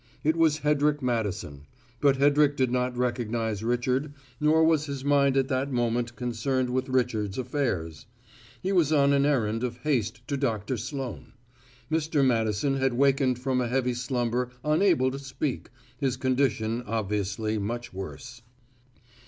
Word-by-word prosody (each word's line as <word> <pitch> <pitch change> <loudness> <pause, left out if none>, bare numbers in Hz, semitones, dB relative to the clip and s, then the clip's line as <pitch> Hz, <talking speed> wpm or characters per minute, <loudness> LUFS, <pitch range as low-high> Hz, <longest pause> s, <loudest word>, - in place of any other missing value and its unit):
It 155 +2 +2
was 160 -2 +3
Hedrick 150 -1 +1
Madison, 100 - -2 0.3
but 140 -2 +4
Hedrick 145 +1 +3
did 130 -2 +1
not 125 0 -1
recognize 115 -3 -1
Richard, 125 +5 0 0.2
nor 155 +2 +4
was 160 -2 +3
his 140 -1 -5
mind 140 -1 +3
at 135 -1 +2
that 135 +1 -1
moment 120 -1 -1
concerned 125 +1 -1
with 130 +1 -1
Richard's 110 -6 0
affairs; 115 - -2 0.6
he 190 - 0
was 170 -6 +3
on 140 -2 +4
an 140 0 +3
errand 115 -5 0
of 120 -1 -3
haste 120 -5 -1
to 140 -2 -1
Doctor 115 -3 -1
Sloane. 130 -1 -6 0.6
Mr. 155 -3 +1
Madison 115 +2 +1
had 135 -2 +1
wakened 135 -1 +3
from 130 0 0
a 120 - -1
heavy 125 0 0
slumber 125 0 -1
unable 150 -4 +3
to 135 - -5
speak, 140 0 -4 0.3
his 130 -2 0
condition 125 -4 0
obviously 105 0 -1
much 120 +4 -4
worse. 120 +6 -8
125 Hz, 145 wpm, -27 LUFS, 115-140 Hz, 0.6 s, but